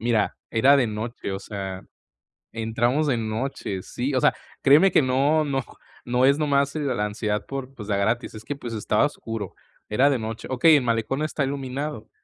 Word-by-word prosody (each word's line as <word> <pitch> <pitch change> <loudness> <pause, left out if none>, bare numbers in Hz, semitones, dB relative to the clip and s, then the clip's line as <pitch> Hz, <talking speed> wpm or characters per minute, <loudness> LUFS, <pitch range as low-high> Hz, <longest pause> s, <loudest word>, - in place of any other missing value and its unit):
Mira, 115 -2 +1
era 135 +5 +5
de 130 - +3
noche, 110 +1 -5
o 95 - -3
sea, 95 -2 -6 0.7
entramos 120 +6 0
de 130 -4 +2
noche, 110 -3 -3
sí, 130 +8 -3
o 130 - +2
sea, - - +4 0.3
créeme 150 +8 +6
que - - +5
no 140 +4 +2
no 135 -3 -1 0.4
no 125 +1 +2
es 140 +2 +4
nomás, 140 -2 +1
eh, - - -1
la 130 -8 0
ansiedad 105 -1 -2
por, 135 -1 -6
pues, 105 -5 -8
de 105 - 0
a - - 0
gratis, 115 +5 0
es 110 0 -9
que, 145 - -4
pues, 120 -4 -7
estaba 105 +3 +2
oscuro, 115 -8 -5 0.4
era 130 +7 +4
de 135 - +1
noche. 110 0 -5
Okey, 155 +5 +6
el 140 - +3
malecón 115 +4 0
está 155 -1 -1
iluminado, 135 -2 -4
125 Hz, 195 wpm, -24 LUFS, 110-140 Hz, 0.7 s, créeme